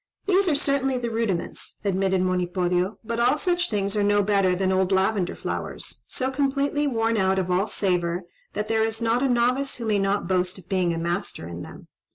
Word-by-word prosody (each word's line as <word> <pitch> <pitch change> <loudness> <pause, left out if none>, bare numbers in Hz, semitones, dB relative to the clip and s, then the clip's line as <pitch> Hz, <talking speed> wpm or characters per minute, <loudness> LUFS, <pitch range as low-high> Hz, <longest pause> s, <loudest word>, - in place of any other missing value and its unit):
"These 390 0 +3
are 310 - +3
certainly 275 -2 +1
the 240 -1 -3
rudiments," 220 -6 -3
admitted 190 -1 +1
Monipodio, 180 +1 0
"but 230 +1 -3
all 250 +5 +3
such 350 +2 0
things 200 -1 -1
are 210 - +2
no 205 0 +3
better 195 -2 +2
than 190 +1 +1
old 190 0 +1
lavender 190 -1 +1
flowers, - - -5
so 260 +1 -2
completely 280 +2 +1
worn 225 -3 +1
out 190 -1 +2
of 185 -1 0
all 190 +4 +2
savour 180 -3 0 0.3
that 210 0 -2
there 220 0 +2
is 225 0 -2
not 230 +1 +1
a 270 - +2
novice 250 +3 +1
who 235 - -5
may 210 -2 +2
not 195 -1 0
boast 180 0 0
of 185 -2 -14
being 185 -3 +1
a 165 - -2
master 170 - -3
in 85 0 -7
them. - - -11
205 Hz, 205 wpm, -25 LUFS, 185-240 Hz, 0.3 s, These